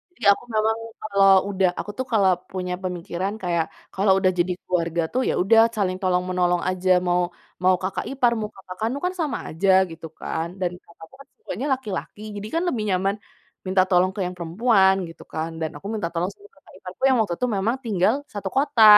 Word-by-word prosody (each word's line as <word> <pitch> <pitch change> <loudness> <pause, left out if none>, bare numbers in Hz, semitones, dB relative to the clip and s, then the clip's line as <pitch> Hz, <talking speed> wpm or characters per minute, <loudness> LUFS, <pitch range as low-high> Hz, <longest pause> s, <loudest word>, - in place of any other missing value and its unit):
Jadi - - -14
aku 200 - 0
memang, 220 +1 +2 0.2
kalau 200 -2 +3 0.2
udah 190 -1 +2
aku 205 - -4
tuh 260 - -2
kalau 200 -4 +4 0.2
punya 180 -1 -3
pemikiran 180 +2 -3
kayak 170 -2 +1 0.3
kalau 195 +1 +3
udah 185 -1 +3
jadi 180 +1 +2
keluarga 170 -2 0
tuh, 255 - +2
ya - - +1
udah 225 +4 +5 0.2
saling 185 -3 0
tolong 180 -1 +2
menolong 180 -1 +1
aja 185 0 -2 0.2
mau 180 0 +3 0.4
mau 185 0 +5
kakak 190 - -2
ipar, 255 -3 +3
mau 210 -1 -3
kakak 185 -1 -10
kandung 255 +8 -1
kan 365 - 0
sama 305 -3 -1
aja, 190 +5 0 0.2
gitu 165 0 -8
kan. 165 +1 -3
Dan 180 -2 +1 0.2
kakakku 170 +4 -15
kan - - -16
semuanya 295 - -5
laki-laki 215 -4 -5
jadi 205 +1 -5
kan 335 - +1
lebih 235 -10 -1
nyaman 195 +1 +1 0.5
minta 185 0 +3
tolong 180 +1 +4
ke - - -6
yang 180 0 -4
perempuan, 190 +3 +3
gitu 165 - -12
kan, 160 +1 -2
dan 160 - -1
aku 195 - -8
minta 210 -6 -1
tolong 175 +3 -1
sama 410 - -18
kakak - - -20
iparku - - -11
yang 260 - +4
waktu 205 -6 +1
itu 250 - +1
memang 220 +6 +1
tinggal 210 -2 +2 0.2
satu 200 -2 -4
kota, 275 -4 +4
190 Hz, 200 wpm, -23 LUFS, 180-220 Hz, 0.5 s, udah